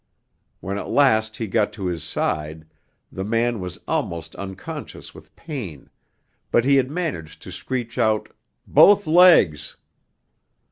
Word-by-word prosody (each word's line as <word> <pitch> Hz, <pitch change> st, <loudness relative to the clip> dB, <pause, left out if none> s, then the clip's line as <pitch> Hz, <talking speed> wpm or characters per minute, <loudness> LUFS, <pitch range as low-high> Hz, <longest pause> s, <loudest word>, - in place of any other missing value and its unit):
When 100 Hz, +2 st, -4 dB
at -, -, -7 dB
last 110 Hz, -6 st, +2 dB
he 115 Hz, -, -3 dB
got 105 Hz, +1 st, 0 dB
to 100 Hz, -3 st, -6 dB
his 85 Hz, -4 st, -3 dB
side, 75 Hz, 0 st, -3 dB, 0.5 s
the 95 Hz, -, -5 dB
man 115 Hz, +2 st, 0 dB
was 90 Hz, -2 st, -6 dB
almost 85 Hz, -1 st, -3 dB
unconscious 95 Hz, -1 st, -8 dB
with -, -, -16 dB
pain, 120 Hz, -, -8 dB, 0.6 s
but 120 Hz, -, +2 dB
he 140 Hz, 0 st, +4 dB
had 130 Hz, -1 st, +1 dB
managed 145 Hz, -, -5 dB
to -, -, -10 dB
screech 120 Hz, -2 st, -5 dB
out 110 Hz, -1 st, +1 dB, 0.4 s
'Both 205 Hz, 0 st, +5 dB
legs.' 155 Hz, -, +4 dB
110 Hz, 135 wpm, -22 LUFS, 90-130 Hz, 0.6 s, Both